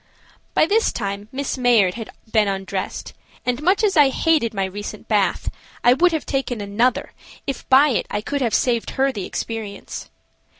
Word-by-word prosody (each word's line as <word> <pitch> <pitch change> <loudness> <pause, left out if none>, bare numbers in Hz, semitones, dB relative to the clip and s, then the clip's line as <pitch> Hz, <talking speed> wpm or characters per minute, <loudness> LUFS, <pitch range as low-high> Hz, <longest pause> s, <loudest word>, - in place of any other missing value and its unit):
By - - +5
this 435 +6 +2
time 200 +1 -4
Miss 270 0 -3
Mayard 230 -7 +4
had 225 -2 -7 0.2
been 215 -2 +3
undressed, 195 0 -4 0.3
and, 250 +2 -1
much 375 +7 +2
as 405 -3 +2
I 290 -3 +6
hated 300 -4 +2
my 195 -2 -1
recent 205 +2 -7
bath, - - +1 0.3
I 245 - +7
would 350 +7 +4
have 320 -2 -2
taken 265 -4 -2
another 210 +5 0 0.3
if 275 - -5
by 275 +3 +7
it 245 - 0
I 205 - -1
could 285 +5 -3
have 235 -4 +1
saved 235 -3 +1
her 270 +1 +3
the 205 -7 -5
experience. 220 -3 -6
245 Hz, 175 wpm, -21 LUFS, 205-280 Hz, 0.3 s, I